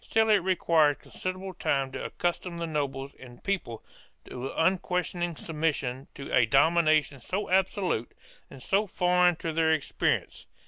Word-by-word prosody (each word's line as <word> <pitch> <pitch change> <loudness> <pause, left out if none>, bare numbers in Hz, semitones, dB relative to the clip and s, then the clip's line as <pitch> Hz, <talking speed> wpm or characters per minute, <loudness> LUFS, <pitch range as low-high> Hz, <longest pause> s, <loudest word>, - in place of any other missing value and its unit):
Still 220 0 +2
it 210 - +7
required 165 -5 +2
considerable 185 +1 -6
time 135 -6 -1
to - - -5
accustom 175 0 -3
the 170 - -2
nobles 140 -3 -3
and 120 -2 -13
people 185 - -3 0.4
to 125 +2 -6
unquestioning 175 0 0
submission 150 -5 -2
to 140 - -8
a 115 -2 +4
domination 155 +1 +3
so 190 - -3
absolute 190 - +1 0.4
and 135 -1 -12
so 205 +2 +1
foreign 180 -1 +3
to 160 0 -4
their 160 0 +2
experience. 155 - -1
165 Hz, 140 wpm, -28 LUFS, 140-185 Hz, 0.4 s, it